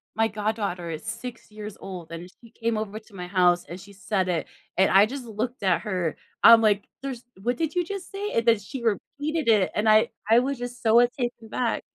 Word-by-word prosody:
my 225 0 +3
goddaughter 205 -5 -2
is 155 - -6
6 225 0 -7
years 210 -1 -8
old, 180 -4 -8
and 170 +2 -7
she 230 -1 -16
came 230 -1 -2
over 215 0 -4
to 215 -1 -23
my 180 -1 -6
house, 180 -2 +3
and 175 +3 -8
she 200 +1 -13
said 190 0 -1
it, 165 -3 -1 0.3
and 190 - +4
I 195 +2 +7
just 265 0 -6
looked 230 +1 -4
at 185 -3 +2
her. 180 -7 -2 0.3
I'm 230 -1 +9
like, 210 -2 +2 0.2
"There's 255 -3 -5 0.2
what 245 +3 0
did 320 0 -2
you 355 -1 +1
just 395 -1 -6
say?" 405 +1 -4
And 230 0 +1
then 225 -3 +5
she 240 +5 -7
repeated 290 +6 -2
it, 205 -4 +4
and 210 +1 +1
I 215 0 +5 0.2
I 230 - +7
was 270 +1 -1
just 245 0 -7
so 225 +1 +6
a 245 - +5
taken 240 -3 -4
back. 235 -1 -1
220 Hz, 225 wpm, -25 LUFS, 195-245 Hz, 0.3 s, I'm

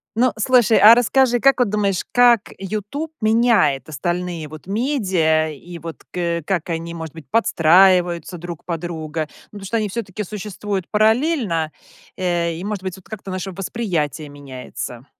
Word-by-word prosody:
Ну, 250 +2 +3
слушай, 235 -1 +4
а 215 +3 +9
расскажи, 245 +1 +3
как 275 +1 +4
вот 245 -4 +3
думаешь, 200 -3 0
как 240 -3 +4
"Ютуб" 215 - -4
меняет 220 - +3
остальные 175 +2 -3
вот 155 0 -11
медиа, 190 - +1
и 170 +4 -10
вот 165 0 -9
к - - -9
э, 170 -2 -1
как 175 0 -2
они, 165 +1 -4
может 160 -2 -7
быть, 160 -2 -12
подстраиваются 180 -3 +3
друг 170 -2 -8
под 170 -2 -3
друга? 160 -2 -4 0.2
Ну, 205 - -9
потому 195 - -9
что 230 +4 -1
они 215 -2 -1
всё-таки 210 -1 -4
существуют 205 -1 -5
параллельно, 220 - +1 0.5
э, 170 -2 0
и, 170 - -7
может 205 -1 -3
быть, 185 -2 -4
вот 190 - -17
как-то 210 -3 -8
наше 185 +1 -4
восприятие 175 - -3
меняется. 130 -3 -8
185 Hz, 160 wpm, -20 LUFS, 165-215 Hz, 0.5 s, а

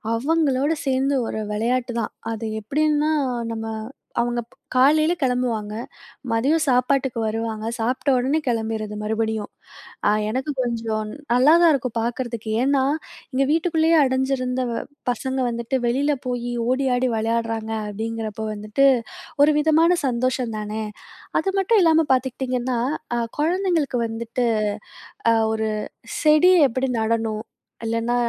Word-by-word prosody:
அவங்களோட 285 +1 +1
சேந்து 270 +1 +1
ஒரு - - -3
விளையாட்டு 240 +3 0
தான். 215 - -4 0.2
அது 225 0 -4
எப்படின்னா, 300 +5 +1 0.4
நம்ம 225 0 -4 0.5
அவுங்க 240 0 -1
ப் - - -24 0.2
காலைல 310 +6 +5
கெளம்புவாங்க, 245 -5 0 0.6
மதியம் 280 +8 +2
சாப்பாட்டுக்கு 255 0 +2
வருவாங்க, 220 0 -3
சாப்ட்ட 250 +5 -1
உடனே 270 +5 +1
கெளம்பிரது 220 -2 -2
மறுபடியும். 220 -1 -1 0.6
அ 205 - +5 0.2
எனக்கு 260 +6 -2
கொஞ்சம் 225 -3 -2 0.2
நல்லா 260 +6 +6
தான் 335 - +7
இருக்கும் 255 -3 -2
பாக்கறதுக்கு, 235 -1 -3
ஏன்னா 275 0 +3 0.5
இங்க 270 +1 +2
வீட்டுக்குள்ளயே 325 0 +3
அடைஞ்சிருந்த 260 -1 0 0.5
பசங்க 265 +1 -3
வந்துட்டு 235 +2 -3
வெளில 280 +5 +2
போயி 245 -1 -2 0.2
ஓடி 265 +1 +1
ஆடி 250 +1 +1
விளையாடுறாங்க 225 0 -1 0.2
அப்டிங்கிறப்போ 220 0 -4
வந்துட்டு, 215 +6 +2 0.6
ஒரு 300 +1 +5
விதமான 320 +3 +4
சந்தோஷந்தானே. 235 -4 -2 0.6
அது 390 - -1
மட்டும் 395 +2 +3
இல்லாம 320 -2 +4
பார்த்துக்டீங்கன்னா, 255 -1 -1 0.4
அ - - +1 0.2
குழந்தைங்களுக்கு 330 -5 +1
வந்துட்டு 235 +2 -2 0.8
அ - - +5 0.2
ஒரு 220 0 -1 0.5
செடி 310 +4 +6 0.2
எப்படி 260 +3 -1
நடணும்? 220 -1 -1 0.4
இல்லைனா 230 +1 0
250 Hz, 115 wpm, -23 LUFS, 225-280 Hz, 0.8 s, தான்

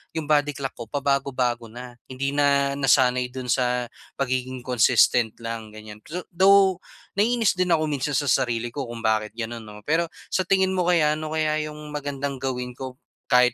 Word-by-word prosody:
'yong 160 - -2
body 145 -1 +2
clock 135 -1 -4
ko, 115 - -8
pabago-bago 140 -2 0 0.2
na. 120 +2 -9 0.2
Hindi 130 +1 -2
na 140 -1 +2
nasanay 125 -2 +3
do'n 130 -1 -5
sa 125 -1 +1 0.3
pagiging 130 -1 -2
consistent 120 -2 +3
lang, 115 -1 -5
ganyan. 110 -1 -10
pzz 170 +9 -7
Though, 190 +1 +5 0.4
naiinis 230 0 +3
din 180 0 +1
ako 155 -1 +2
minsan 145 0 -2
sa 145 - 0
sarili 120 -2 +1
ko 140 -2 -3
kung 120 -1 -7
bakit 110 -1 +1
ganun, 115 0 -4
'no. 105 0 -11
Pero, 165 +3 +2 0.3
sa - - +3
tingin 190 0 +2
mo 180 -2 0
kaya, 155 -4 +4
ano 155 0 -5
kaya 155 -1 +1
yung 150 0 -10
magandang 140 -1 -3
gawin 125 -2 -3
ko 130 -1 -7 0.3
kahit 125 -1 +5
135 Hz, 175 wpm, -24 LUFS, 125-150 Hz, 0.4 s, Though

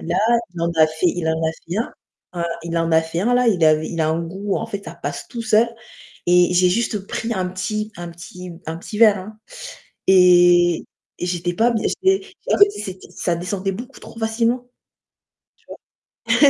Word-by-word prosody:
Là 170 +2 -2 0.4
il 170 - -6
en 170 - +1
a 155 - +6
fait 160 +3 -1
il 170 -2 0
en 160 0 0
a - - -2
fait 170 +3 -7
un, 230 - -2 0.5
heu, - - 0 0.2
il 170 0 -3
en 165 0 +1
a 160 - +6
fait 165 +1 -4
un 245 +5 +2
là, 250 0 +3
il 180 -7 +3
avait 155 0 +3
il 165 - -3
a 155 - +2
un 160 +1 0
goût 190 +4 -3
en 225 - -3
fait 200 -3 -6
ça - - -8
passe - - -6
tout 235 -3 -5
seul 220 +1 +3 0.6
et 180 0 +4
j'ai 180 0 +5
juste 205 0 -1
pris 235 0 -3
un 185 -1 -1
petit 210 +4 -3
un 175 0 -6
petit 180 +1 -10
un 160 +1 -4
petit 210 +5 -7
verre, 215 -4 +6
hein 215 +3 -10 0.7
et 175 -2 +5 0.3
et - - -2
j'étais 175 0 -2
pas 235 +5 +3
b 230 - 0 0.3
j'étais 385 +1 +2 0.3
en - - +3
fait 405 0 +7
c'était 190 - -8
ça 175 - -1
descendait 190 +3 -3
beaucoup 245 +7 -8
trop 230 - -12
facilement. 230 +2 0 1.6
Tu - - +3
vois? 285 - +8
185 Hz, 205 wpm, -21 LUFS, 170-220 Hz, 1.6 s, vois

